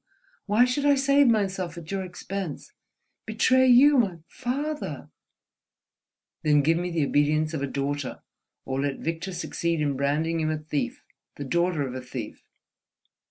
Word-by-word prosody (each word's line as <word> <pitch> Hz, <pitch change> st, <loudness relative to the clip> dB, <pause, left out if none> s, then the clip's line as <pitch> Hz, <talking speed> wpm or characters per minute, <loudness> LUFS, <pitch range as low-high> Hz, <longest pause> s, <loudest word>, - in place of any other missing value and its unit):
Why 215 Hz, +4 st, +5 dB
should 250 Hz, +3 st, -1 dB
I 285 Hz, 0 st, +5 dB
save 275 Hz, +1 st, +4 dB
myself 190 Hz, -6 st, 0 dB
at 165 Hz, 0 st, -9 dB
your 195 Hz, -1 st, -2 dB
expense?—betray 200 Hz, -, -2 dB
you—my 250 Hz, -7 st, +5 dB
father—!" 285 Hz, +5 st, -4 dB, 1.3 s
"Then 150 Hz, -3 st, +3 dB
give 165 Hz, +3 st, +2 dB
me 180 Hz, 0 st, -2 dB
the 165 Hz, -4 st, 0 dB
obedience 155 Hz, +2 st, +1 dB
of 155 Hz, -, -3 dB
a 140 Hz, -, -1 dB
daughter... 140 Hz, 0 st, -3 dB, 0.4 s
or 135 Hz, 0 st, -2 dB
let 140 Hz, -1 st, -1 dB
Victor 165 Hz, +3 st, -4 dB
succeed 170 Hz, -2 st, -2 dB
in 145 Hz, -2 st, 0 dB
branding 150 Hz, +5 st, 0 dB
you 155 Hz, -1 st, 0 dB
a 155 Hz, -, -1 dB
thief, 150 Hz, -1 st, -4 dB, 0.3 s
the 145 Hz, -, -6 dB
daughter 170 Hz, -1 st, 0 dB
of 125 Hz, -, -6 dB
a 130 Hz, -, -5 dB
thief!" 125 Hz, -3 st, -7 dB
170 Hz, 145 wpm, -26 LUFS, 145-220 Hz, 1.3 s, Why